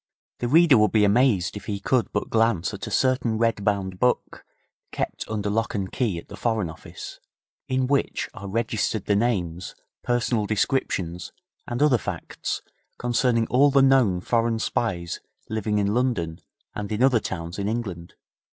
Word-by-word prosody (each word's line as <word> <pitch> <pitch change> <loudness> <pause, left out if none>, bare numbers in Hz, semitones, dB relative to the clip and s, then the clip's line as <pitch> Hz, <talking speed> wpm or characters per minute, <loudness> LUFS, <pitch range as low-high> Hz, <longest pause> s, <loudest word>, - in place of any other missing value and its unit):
The 120 - -1
reader 155 -2 +6
would 105 0 +4
be 105 -2 +5
amazed 105 -5 +3
if 105 - -7
he 100 -1 -3
could 125 +4 +1
but - - -2
glance 110 -4 +2
at 100 - -6
a - - -4
certain 125 -1 +1
red 115 -2 +1
bound 95 -3 -1
book, 125 +2 0 0.5
kept - - -3
under 105 -2 -2
lock 110 +2 -1
and 95 -2 -2
key 110 -9 -1
at 85 - -9
the 100 - -9
Foreign 110 -5 -1
Office, 80 - -10 0.5
in 130 0 +1
which 140 +1 0
are 100 -1 -8
registered 110 -1 -1
the 100 - +2
names, 95 -6 -1 0.3
personal 120 -3 0
descriptions 95 -6 -1 0.4
and 120 +4 0
other 135 -6 +4
facts - - -4 0.3
concerning 120 -1 +1
all 135 +5 +4
the 135 -1 +4
known 125 -10 +4
foreign 115 +2 +1
spies 90 -6 -2 0.3
living 110 -1 0
in 100 0 +1
London 105 -10 0 0.3
and 105 0 -5
in 110 +4 +1
other 130 -3 +5
towns 85 -2 -5
in 100 - -1
England. 100 -7 -4
110 Hz, 165 wpm, -25 LUFS, 100-120 Hz, 0.5 s, reader